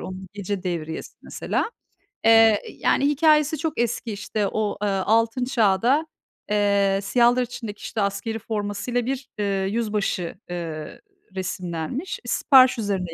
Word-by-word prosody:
onun 185 Hz, 0 st, -7 dB
Gece 200 Hz, -1 st, -4 dB
Devriyesi 160 Hz, -3 st, -5 dB
mesela. -, -, -2 dB, 0.6 s
Eee, 225 Hz, -2 st, +6 dB
yani, 280 Hz, -, +1 dB
hikâyesi 305 Hz, +1 st, +3 dB
çok 315 Hz, +1 st, -3 dB
eski. 235 Hz, 0 st, -1 dB
İşte, 205 Hz, 0 st, -2 dB
o, 215 Hz, 0 st, -2 dB
eee, 210 Hz, -, +1 dB
Altın 225 Hz, +5 st, +1 dB
Çağ'da, 245 Hz, +5 st, +2 dB, 0.4 s
eee, 200 Hz, -1 st, +2 dB
siyahlar 240 Hz, +3 st, +3 dB
içindeki, 230 Hz, -4 st, -6 dB
işte, 215 Hz, -, -3 dB
askerî 200 Hz, +3 st, -2 dB
formasıyla 215 Hz, +2 st, -2 dB
bir, 265 Hz, +1 st, -3 dB
ııı, 195 Hz, -2 st, 0 dB
yüzbaşı, 210 Hz, -5 st, -1 dB, 0.2 s
ııı, 160 Hz, -3 st, -6 dB, 0.3 s
resimlenmiş. 185 Hz, -, -4 dB
Sipariş 260 Hz, -3 st, +5 dB
üzerine 195 Hz, -6 st, -2 dB
210 Hz, 125 wpm, -24 LUFS, 195-245 Hz, 0.6 s, Eee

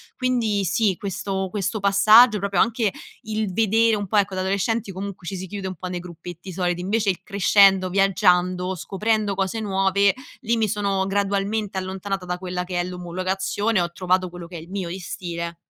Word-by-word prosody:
Quindi, 235 Hz, -6 st, 0 dB
sì, 195 Hz, +1 st, +1 dB
questo 190 Hz, -1 st, -3 dB
questo 205 Hz, +1 st, -2 dB
passaggio, 210 Hz, +3 st, +6 dB
proprio 200 Hz, -2 st, +1 dB
anche 225 Hz, -3 st, +1 dB, 0.3 s
il 215 Hz, -2 st, -2 dB
vedere 225 Hz, +2 st, +3 dB
un 205 Hz, -1 st, -4 dB
po', 215 Hz, -, -3 dB
ecco 200 Hz, -2 st, +2 dB
da -, -, -2 dB
adolescenti 200 Hz, +2 st, -1 dB
comunque 190 Hz, -1 st, -7 dB
ci 195 Hz, -, -3 dB
si 185 Hz, +1 st, -5 dB
chiude 200 Hz, 0 st, -5 dB
un 185 Hz, -, -5 dB
po' 185 Hz, +2 st, -6 dB
nei 180 Hz, -1 st, -3 dB
gruppetti 175 Hz, +1 st, -9 dB
soliti, 175 Hz, -1 st, -1 dB
invece 205 Hz, +3 st, 0 dB
il 185 Hz, -, -1 dB
crescendo, 195 Hz, -2 st, +4 dB
viaggiando, 180 Hz, -1 st, +2 dB
scoprendo 210 Hz, +2 st, -1 dB
cose 195 Hz, +3 st, -1 dB
nuove, 195 Hz, -1 st, +2 dB, 0.3 s
lì 235 Hz, -1 st, +1 dB
mi 220 Hz, -2 st, +1 dB
sono 200 Hz, -2 st, 0 dB
gradualmente 200 Hz, +1 st, -1 dB
allontanata 190 Hz, 0 st, -4 dB
da 180 Hz, 0 st, -3 dB
quella 180 Hz, -1 st, -4 dB
che 180 Hz, 0 st, -3 dB
è 175 Hz, -, 0 dB
l'omologazione, 185 Hz, +3 st, -1 dB
ho 175 Hz, 0 st, -2 dB
trovato 185 Hz, +1 st, 0 dB
quello 175 Hz, -1 st, -9 dB
che 175 Hz, -, -11 dB
è -, -, -8 dB
il 170 Hz, -, -13 dB
mio 190 Hz, -2 st, -3 dB
di 185 Hz, +3 st, -5 dB
stile. 170 Hz, -2 st, -5 dB
195 Hz, 185 wpm, -23 LUFS, 180-205 Hz, 0.3 s, passaggio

